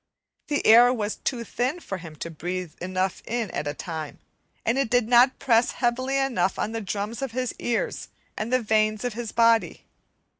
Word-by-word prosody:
The 290 - -1
air 240 +3 +8
was 215 -4 -2
too 245 -3 -3
thin 255 - -2
for 195 - -6
him 165 -2 -10
to 170 +2 -6
breathe 175 +1 -5
enough 185 +1 -2
in 230 -4 -3
at 145 - -3
a 145 - -3
time, 160 -3 -6 0.5
and 235 +4 +1
it 275 -4 0
did 245 -2 +2
not 245 +2 +5
press 230 -1 +2
heavily 255 +2 0
enough 240 -9 0
on 215 - -2
the 225 0 -3
drums 205 +3 -4
of 270 -4 -4
his 255 0 -2
ears 235 -1 -2 0.3
and 220 +3 -4
the 255 -1 +2
veins 215 0 +1
of 245 -2 -2
his 235 -1 -5
body. 230 0 +2
225 Hz, 190 wpm, -25 LUFS, 195-245 Hz, 0.5 s, air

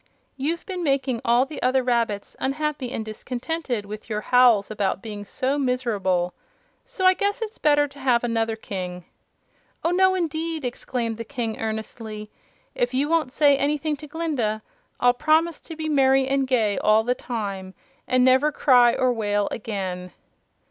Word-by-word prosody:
"You've 310 +5 -2
been 370 -3 -4
making 275 -6 0
all 240 +2 +3
the 295 +2 -8
other 255 +1 +2
rabbits 230 -5 -1
unhappy 280 -2 -2
and 220 - -4
discontented 245 +2 -4
with 210 +2 -9
your 210 -1 -2
howls 240 -4 +4
about 200 -2 -1
being 210 -2 -6
so 265 +7 -1
miserable. 205 -9 0 0.5
So - - -3
I 370 - +7
guess 405 +3 -1
it's 435 0 -7
better 290 -1 +3
to 285 0 -15
have 250 -3 +2
another 225 -1 0
King." 180 -5 -6 0.8
"Oh, 335 - +2
no 375 +1 +4
indeed!" 325 -3 -2
exclaimed 240 -2 -3
the 230 - -4
King, 230 -2 -4
earnestly. 220 -1 -5 0.4
"If 245 +1 -1
you 285 +3 +1
won't 320 -6 +1
say 290 0 +4
anything 295 +2 0
to 300 +1 -10
Glinda 280 -9 -2 0.4
I'll 245 0 +4
promise 315 +4 +2
to 325 - -9
be 315 0 -4
merry 270 -2 +3
and 270 0 +1
gay 225 -6 +1
all 215 +1 +4
the 245 +2 +1
time, 200 -7 -5 0.3
and 255 0 +3
never 260 +4 +4
cry 245 -5 +5
or 255 -1 +2
wail 205 -2 0
again." 185 -5 -4
250 Hz, 160 wpm, -24 LUFS, 220-290 Hz, 0.8 s, I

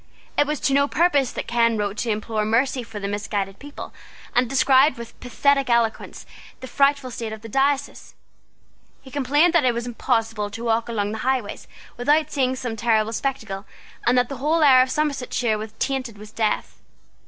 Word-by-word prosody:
It 290 - +3
was 300 -1 -2
to 275 - +1
no 280 +1 +3
purpose 290 -6 +2
that - - -5
Ken 230 -1 +2
wrote 205 -1 -2
to 235 - -2
implore 215 0 -1
mercy 250 +5 +1
for 225 -3 -8
the 200 - -4
misguided 200 -1 -3
people, 290 +1 -9 0.4
and 245 -1 +2
described 270 +2 +4
with 235 -1 -10
pathetic 275 +2 +1
eloquence 235 -2 0 0.3
the 260 - -8
frightful 275 -1 +1
state 230 -2 -5
of 220 0 -8
his 225 - -9
diocese. 280 +2 -1 0.9
He 265 - -13
complained 290 +5 +2
that 340 -3 +4
it 245 -2 +2
was 235 0 -3
impossible 225 -3 -1
to 225 +3 -8
walk 230 0 0
along 205 -3 -1
the 220 - -5
highways 255 -4 -2 0.3
without 295 +5 +2
seeing 260 -2 0
some 245 -3 -4
terrible 225 -1 +1
spectacle, 220 -7 -4 0.4
and 245 +1 +3
that 250 0 +3
the 275 - -6
whole 310 +5 +1
air 260 -3 +7
of 255 - +1
Somersetshire 255 -6 -1
was 215 0 -7
tainted 260 -5 -2
with 210 +1 -12
death. 220 -2 -2
245 Hz, 185 wpm, -23 LUFS, 220-275 Hz, 0.9 s, air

